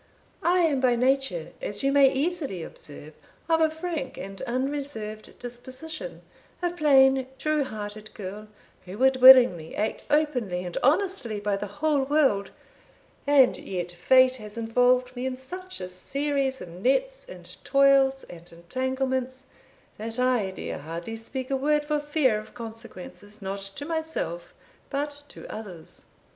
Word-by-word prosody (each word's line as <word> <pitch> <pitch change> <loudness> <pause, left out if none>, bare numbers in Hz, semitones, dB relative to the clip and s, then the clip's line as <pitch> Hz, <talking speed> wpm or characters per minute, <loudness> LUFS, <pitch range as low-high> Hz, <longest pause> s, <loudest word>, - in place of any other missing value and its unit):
I 355 +1 +3
am 305 -5 +2
by 250 -2 +4
nature, 270 - 0
as - - -3
you 275 - +3
may 275 -1 +6
easily 280 - -2
observe, 150 0 -8 0.3
of 325 -1 +3
a 320 - +5
frank 320 -3 -4
and 195 0 -7
unreserved 255 -4 -4
disposition 260 - -8 0.4
a 350 -1 0
plain 270 -5 +4
true 305 +1 +1
hearted 215 -2 -7
girl, 210 0 -7 0.4
who 185 +2 -8
would 265 +2 +4
willingly 245 -11 +8
act 215 - -2
openly 250 -12 +1
and 175 - -6
honestly 285 - +1
by 205 0 0
the 195 - -4
whole 295 -1 0
world, 270 -8 +2 0.8
and 280 -3 +5
yet 180 -2 -4
fate 255 +8 +4
has 210 -1 -9
involved 250 +2 +2
me 250 +1 -2
in 255 -1 -3
such 365 +8 -7
a 185 - -5
series 270 +8 -2
of 180 - -8
nets - - 0
and - - -11
toils, 275 -1 +4
and 175 0 -12
entanglements, 260 +8 -2 0.6
that 225 +2 -5
I 250 -6 +2
dare 190 - -6
hardly 165 +8 -6
speak 255 +4 -6
a - - +2
word 295 +2 +1
for 300 0 0
fear 290 -7 +1
of 215 - -13
consequences 225 -2 -9
not 195 0 -4 0.2
to 285 - -6
myself, 320 - -3 0.4
but 290 +1 -3
to - - -11
others." 190 -7 -8
260 Hz, 145 wpm, -26 LUFS, 215-290 Hz, 0.8 s, willingly